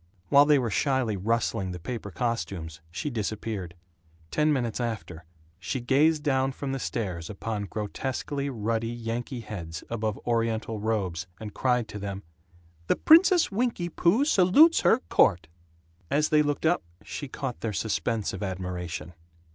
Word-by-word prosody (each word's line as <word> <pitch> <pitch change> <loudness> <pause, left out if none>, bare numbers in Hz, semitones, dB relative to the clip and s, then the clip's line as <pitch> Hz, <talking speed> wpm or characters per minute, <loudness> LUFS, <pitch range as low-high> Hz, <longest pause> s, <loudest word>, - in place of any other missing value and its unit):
While 140 +1 +7
they 150 -1 +6
were 120 -4 -1
shyly 130 -1 +1
rustling 105 -1 -1
the 90 - -6
paper 110 +2 -5
costumes 95 -7 -3
she 95 - -4
disappeared. 105 -5 -4 0.6
Ten 155 0 +2
minutes 125 -6 -1
after 110 -8 -4 0.3
she 130 - -3
gazed 145 +5 +3
down 135 -2 +1
from 140 0 -4
the 135 - -2
stairs 90 -10 -3
upon 105 0 -4
grotesquely 130 +7 -3
ruddy 115 -2 -1
Yankee 120 +2 -4
heads 85 -8 -7
above 110 -3 -2
Oriental 115 -2 0
robes, 100 -6 -1
and 105 -2 -7
cried 125 -3 +1
to 105 - -6
them, 100 0 -5 0.6
"The - - +3
Princess 350 - +6
Winky 210 -5 -1
Poo 185 - +3
salutes 290 - +6
her 245 - +4
court!" 90 -6 +3 0.6
As 150 +2 +2
they 155 -1 +5
looked 145 +1 -1
up 175 +2 +3 0.2
she 145 - -6
caught 130 -1 -5
their 115 - -1
suspense 110 +1 -1
of 95 - -6
admiration. 90 -3 -4
115 Hz, 145 wpm, -27 LUFS, 100-140 Hz, 0.6 s, While